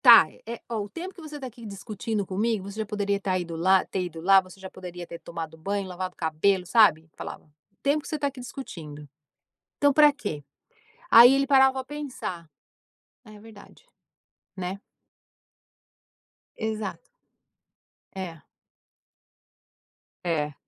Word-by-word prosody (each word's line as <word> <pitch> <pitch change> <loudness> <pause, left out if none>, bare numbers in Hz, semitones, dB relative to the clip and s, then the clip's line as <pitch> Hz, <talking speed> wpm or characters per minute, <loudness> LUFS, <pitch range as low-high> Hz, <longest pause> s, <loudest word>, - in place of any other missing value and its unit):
Tá. 235 -8 +10 0.2
Eh, 235 0 -5
ó, 230 -2 -2
o 205 - -6
tempo 360 - -7
que 350 - -13
você 300 -2 -8
tá, 270 - -6
aqui, 240 -1 -13
discutindo 205 +1 -4
comigo, 200 +1 -1
você 210 - -8
já, 220 - -1
poderia 205 -1 -1
estar 195 -2 -1
ido 170 -2 -4
lá 185 +3 +4
ter 185 - -2
ido, 165 -2 -7
lá. 195 +3 +6
Você 185 +1 -15
já 190 0 -8
poderia 180 -2 -8
ter 170 0 -9
tomado 165 -1 -7
banho, 195 +3 -2
lavado 185 0 -5
o - - -55
cabelo, 180 +4 +1
sabe. 170 -6 +5
Falava: - - -8
"O 155 +5 -35
tempo 285 +2 +2
que - - -11
você 310 - -2
tá 285 -1 0
aqui 275 -2 -7
discutindo. 160 - -8 0.7
Então, 285 0 +4
pra 295 +1 +7
quê?" 205 - -5 0.7
Aí, 240 +3 +10
ele 275 0 +2
parava 265 -1 +6
pra 265 -1 -3
pensar, 215 - -6 0.8
"É 215 -1 -13
verdade". 220 - -15 0.7
Né. 185 +1 -4 1.8
Exato. 220 -2 -3 1.2
É. 175 -5 -6 1.8
É. 150 -4 0
200 Hz, 150 wpm, -26 LUFS, 175-235 Hz, 1.8 s, Tá